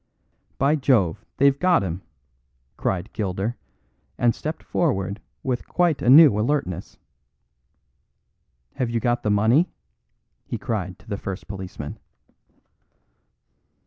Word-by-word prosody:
"By 145 +4 +3
Jove! 110 - +2
they've 140 0 +4
got 180 - +3
him," 90 0 -4 0.7
cried 95 +1 -2
Gilder, 100 +3 -2 0.6
and 120 -1 +3
stepped 155 +1 -5
forward 100 - -1 0.2
with 125 -2 -2
quite 175 -4 +1
a 120 - +1
new 140 -6 +8
alertness. 110 - -2 1.8
"Have 125 -3 0
you 115 0 0
got 120 +1 0
the 105 - -1
money!" 110 - +3 0.7
he - - -4
cried 95 -5 -3
to 100 - -22
the 100 -2 -3
first 95 -4 -6
policeman. 95 -7 -7
110 Hz, 110 wpm, -23 LUFS, 95-140 Hz, 1.8 s, new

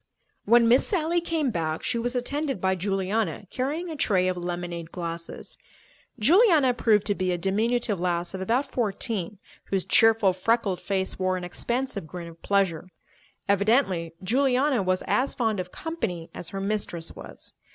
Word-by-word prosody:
When 235 +2 +6
Miss 245 +3 +5
Sally 345 -2 +1
came 320 -6 0
back, 160 -4 -2
she 240 -2 0
was 245 +2 -2
attended 275 0 -2
by 190 +1 +2
Juliana 195 +1 -1
carrying 290 +7 -2
a - - -4
tray 190 -9 +2
of 185 - 0
lemonade 175 -1 -5
glasses. 170 -1 -5 0.6
Juliana 315 - +5
proved 215 -4 +3
to 205 - +2
be 185 -2 -1
a 175 - 0
diminutive 210 +3 0
lass 175 0 -1
of 190 - -5
about 235 +8 +1
fourteen 210 -3 -2 0.3
whose 190 -2 -1
cheerful, 225 -4 +5
freckled 195 -1 0
face 190 -1 -2
wore 185 0 +1
an 180 - -6
expansive 235 +1 -3
grin 175 0 -7
of 165 0 -16
pleasure. 185 -4 0 0.6
Evidently 200 -5 +2
Juliana 260 +3 +2
was 185 -1 0
as 260 +2 +1
fond 225 -5 0
of 180 0 -5
"company" 185 - -4
as 175 - -7
her 195 - -5
mistress 195 -5 -3
was. - - -8
200 Hz, 160 wpm, -26 LUFS, 180-245 Hz, 0.6 s, When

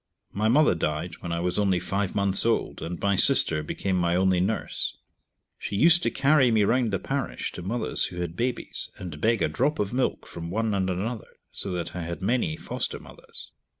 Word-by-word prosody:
My 105 +2 0
mother 145 +3 +4
died 80 +1 -3
when 85 - -6
I 85 0 -1
was 90 +3 -1
only 95 -3 +2
five 100 +2 -2
months 100 -1 +4
old, 115 0 0
and 85 +1 -5
my 100 0 +1
sister 90 - +4
became 95 +5 -2
my 85 -1 +1
only 95 0 +3
nurse. 100 +5 -2 0.6
She 100 - -4
used 165 +9 +5
to - - +1
carry 135 -1 +3
me 110 -2 +3
round 120 +3 +2
the 95 - +1
parish 135 +5 -3
to - - -8
mothers 110 +7 +1
who 90 - -6
had 85 -1 -4
babies, 125 +3 -3
and 80 -5 -8
beg 115 -1 +2
a - - +3
drop 145 +4 0
of 105 +1 -2
milk 130 +1 -1
from 85 0 -7
one 110 +3 -1
and 95 -1 0
another, 105 +5 -4
so 100 - -3
that 90 0 -4
I 90 - -3
had 85 +1 -5
many 100 -5 0
foster - - -4
mothers. - - -11
100 Hz, 205 wpm, -26 LUFS, 90-115 Hz, 0.6 s, used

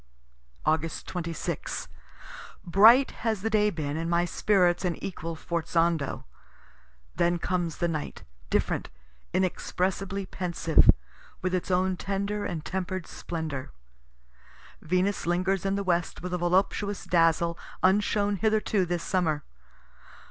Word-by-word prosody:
Aug. 160 0 0
26. 170 -3 -4 0.8
Bright 225 +9 +7
has 220 -4 0
the 225 - 0
day 210 -1 +4
been, 155 -5 -3
and 165 +1 -2
my 170 0 +2
spirits 180 -1 +2
an 175 -2 0
equal 165 -3 -5
forzando. 165 -2 0 0.9
Then 175 0 +2
comes 175 -2 -2
the 170 - +1
night, 155 -3 -4 0.3
different, - - 0 0.4
inexpressibly 190 +1 -1
pensive, 170 -3 +2 0.5
with 185 0 0
its 185 0 -1
own 185 0 +1
tender 200 +2 -2
and 160 -4 -4
temper'd 185 -1 -3
splendor. 155 - -5 1.1
Venus 185 +3 0
lingers 185 +2 +1
in 195 - +1
the 200 - -1
west 175 -2 -1
with 180 0 -4
a 180 - 0
voluptuous 190 +3 +1
dazzle 170 0 +3 0.3
unshown 205 +1 +2
hitherto 215 -1 +1
this 175 -1 -2
summer. 160 -6 0
180 Hz, 120 wpm, -27 LUFS, 170-195 Hz, 1.1 s, Bright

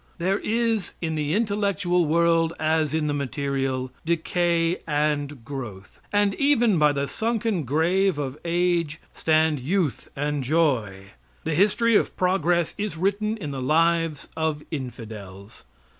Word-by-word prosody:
There 190 +3 0
is 225 -2 -1
in 160 -2 -2
the 150 +1 -1
intellectual 200 -5 +1
world, 165 +1 +3
as 155 -1 +1
in 155 0 0
the 150 - 0
material, 135 -2 -2
decay 170 +1 +1
and 145 -4 -1
growth; 120 -9 -8
and 205 -1 +2
even 240 - +3
by 150 -1 +5
the 140 0 -1
sunken 220 - -1
grave 170 +6 +2
of 135 -2 -3
age 170 -2 0
stand 155 -2 +2
youth 160 +2 -1
and 145 0 -1
joy. 120 -10 0 0.3
The 160 - -1
history 210 +6 +3
of - - +1
progress 175 -2 +1
is 205 -5 -3
written 205 +5 0
in 150 -9 -5
the 135 -1 -4
lives 165 +1 +1
of 160 -2 -1
infidels. 110 - -8
160 Hz, 135 wpm, -24 LUFS, 145-185 Hz, 0.3 s, by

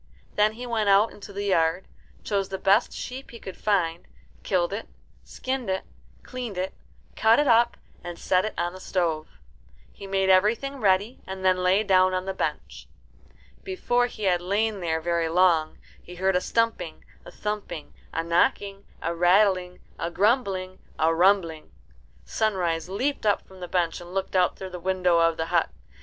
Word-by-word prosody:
Then 210 +1 +3
he 245 +3 -7
went 225 -4 0
out 200 +3 +5
into 205 0 -11
the 200 +1 -4
yard, 175 -2 +1 0.4
chose 200 -2 -1
the 190 - -3
best 200 +5 +3
sheep 260 +2 -7
he 235 - -10
could 190 - -8
find, 175 -5 0 0.3
killed 185 -1 0
it, 210 - -5 0.4
skinned 260 -4 -4
it, 190 0 -1 0.4
cleaned 245 -6 -6
it, 185 +1 -2 0.4
cut 225 +1 +4
it 295 - +3
up, 235 0 +4 0.3
and 175 0 -7
set 185 +1 +1
it 215 - -4
on 175 +1 -1
the 185 - -10
stove. 170 -5 -1 0.7
He 200 - -10
made 195 0 +1
everything 225 +9 +2
ready, 205 +1 +1
and 190 0 -6
then 185 -1 +4
lay 185 +3 +3
down 185 -2 +4
on 185 0 -2
the 190 - -3
bench. - - -4 0.8
Before 245 -11 0
he 215 - -9
had 180 -3 +2
lain 205 +3 0
there 165 -2 -1
very 170 0 0
long 165 -2 +3 0.2
he 180 - -12
heard 190 +1 +1
a 180 - +2
stumping, 225 -9 -1 0.2
a - - -11
thumping, 210 -7 -5 0.2
a 165 - -2
knocking, 195 +4 0 0.2
a 170 - -1
rattling, 180 +1 +2 0.2
a 170 - -2
grumbling, 190 -2 0 0.2
a 160 +1 +3
rumbling. 170 -3 +2 0.5
Sunrise 175 - -1
leaped 250 +4 -1
up 205 - +2
from 190 0 -15
the 180 - -6
bench 175 -1 -1
and 175 +2 -10
looked 195 0 -2
out 180 -1 +3
through 190 -1 -8
the 180 - -6
window 180 -1 +2
of 165 -1 +3
the 160 - -1
hut. 170 - +3
190 Hz, 175 wpm, -25 LUFS, 175-210 Hz, 0.8 s, out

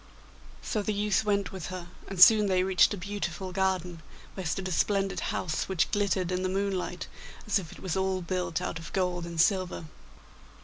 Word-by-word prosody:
So 215 - -1
the 210 0 -2
youth 210 0 +1
went 200 -4 +1
with 190 -4 -6
her, 185 -1 -6 0.2
and 195 -2 -6
soon 210 +2 +8
they 185 -1 +2
reached 190 0 +4
a 205 - -2
beautiful 185 -2 -4
garden, 180 -3 -1 0.3
where 190 -3 -4
stood 185 +4 -2
a - - -4
splendid 195 +1 +1
house, 160 +1 -2
which 175 -3 +1
glittered 195 -3 0
in 180 0 0
the 185 - 0
moonlight 190 -2 -2 0.4
as 210 -1 +2
if 170 -4 -9
it - - -12
was 185 -4 -2
all 190 -1 0
built 180 -1 -2
out 165 - -3
of 165 - -9
gold 180 -2 -1
and 170 -1 -6
silver. 185 -1 +2
185 Hz, 190 wpm, -29 LUFS, 180-195 Hz, 0.4 s, soon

